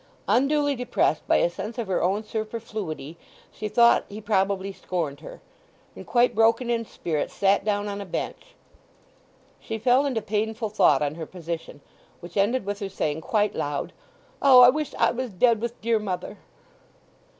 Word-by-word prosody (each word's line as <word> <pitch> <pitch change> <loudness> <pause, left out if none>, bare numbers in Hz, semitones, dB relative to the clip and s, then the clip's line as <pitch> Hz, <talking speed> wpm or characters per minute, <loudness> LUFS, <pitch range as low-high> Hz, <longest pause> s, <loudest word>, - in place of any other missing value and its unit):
Unduly 280 +6 +2
depressed 245 - 0
by - - +4
a - - +4
sense 205 +7 -7
of 235 - -2
her 190 -2 -1
own 195 +4 0
superfluity 215 -8 -5 0.3
she 215 - -5
thought 235 +2 +5
he 205 - -7
probably 195 -2 0
scorned 160 -7 -4
her; - - -11 0.5
and - - -11
quite 245 0 +3
broken 230 +2 +2
in 230 -1 -1
spirit 155 -7 -3
sat 200 0 +2
down 205 0 -1
on 200 0 -4
a - - -6
bench. - - -5 1.0
She 225 - -5
fell 255 +5 +3
into 230 -6 -2
painful 220 +1 -2
thought 150 -9 +3
on 145 0 -1
her 160 -1 -7
position, 165 -4 -7 0.4
which 175 0 -12
ended 210 +4 +1
with 205 0 -3
her 200 - -4
saying 155 -4 -2
quite 210 +3 0
loud, 145 0 -3 0.5
"O, 260 -3 +8
I 245 - +9
wish 300 +2 -2
I - - +3
was 255 +1 -4
dead 225 +3 +2
with 235 0 -4
dear 230 0 +1
mother!" 190 -4 -5
210 Hz, 170 wpm, -25 LUFS, 185-235 Hz, 1.0 s, I